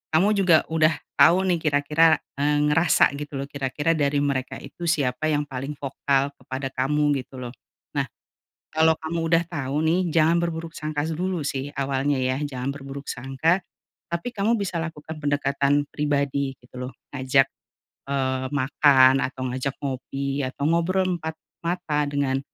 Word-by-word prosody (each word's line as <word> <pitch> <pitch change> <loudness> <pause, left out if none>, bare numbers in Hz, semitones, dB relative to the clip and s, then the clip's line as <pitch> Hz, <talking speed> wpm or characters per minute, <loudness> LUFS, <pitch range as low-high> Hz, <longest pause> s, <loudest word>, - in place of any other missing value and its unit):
kamu 185 +6 +5
juga 180 -4 +6
udah 160 0 +4 0.3
tau 180 +3 +6
nih 180 -3 +1
kira-kira, 155 +2 +4 0.2
eee, 145 +1 +2
ngerasa 160 +2 +4
gitu 145 -1 -6
loh, - - -2
kira-kira 140 +3 -1
dari 145 -1 +1
mereka 135 -2 -1
itu 175 - -7
siapa 145 -2 0
yang 150 -1 +1
paling 135 +1 -5
vokal 140 0 0
kepada 130 +1 -5
kamu 145 +2 +1
gitu 130 - -13
loh. 120 -1 -6 0.4
Nah, - - +1 0.7
kalo 160 +1 +4
kamu 160 +1 -3
udah 165 +1 +3
tau 145 -5 -3
nih, 175 +3 +2
jangan 165 +1 +4
berburuk 165 -1 -3
sangka 150 -1 -2
dulu 180 +1 -2
sih 140 0 -3
awalnya 135 +1 0
ya, 130 0 0
jangan 130 -2 -3
berburuk 140 0 -8
sangka, 135 +8 0 0.5
tapi 170 +8 -2
kamu 215 +3 +2
bisa 190 -3 -2
lakukan 160 -1 -6
pendekatan 145 0 +1
pribadi 140 -2 0
gitu 125 - -18
loh, - - -8 0.2
ngajak, 135 0 +3 0.6
eee, 130 -1 0
makan 135 -1 +5
atau 130 0 -4
ngajak 130 +2 -3
ngopi 140 +1 -3
atau 130 +2 -5
ngobrol 170 +3 +2
empat 160 0 -5 0.3
mata 170 -4 0
dengan 140 -2 0
145 Hz, 150 wpm, -24 LUFS, 135-160 Hz, 0.7 s, juga